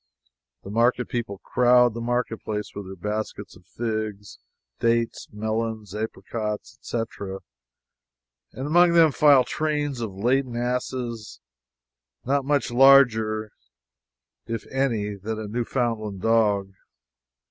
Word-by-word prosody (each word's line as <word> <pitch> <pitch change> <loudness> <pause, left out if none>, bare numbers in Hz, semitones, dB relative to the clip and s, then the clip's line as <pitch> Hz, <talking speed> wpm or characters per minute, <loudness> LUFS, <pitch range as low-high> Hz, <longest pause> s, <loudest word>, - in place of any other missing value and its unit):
The 100 - -8
market 120 +2 +2
people 115 -5 -3
crowd 125 -1 +4
the 115 - -5
marketplace 115 -3 -2
with 100 -2 -7
their 95 - -8
baskets 105 +4 -5
of - - -19
figs, 110 -3 -4 0.4
dates, 115 0 0
melons, 110 -1 -3
apricots, 105 0 -5
etc., 100 -4 -5 1.1
and 130 - -6
among 170 +3 +5
them 165 -2 +6
file 140 0 +6
trains 145 0 -2
of 105 -5 -4
laden 125 +4 0
asses, 120 - -3 0.9
not 140 +1 +1
much 140 -6 +1
larger, 115 -5 +5 1.0
if 115 0 -4
any, 115 -6 0
than 105 +3 -5
a 110 - -5
Newfoundland 115 -3 -2
dog. 105 -4 +2
115 Hz, 110 wpm, -24 LUFS, 105-125 Hz, 1.1 s, them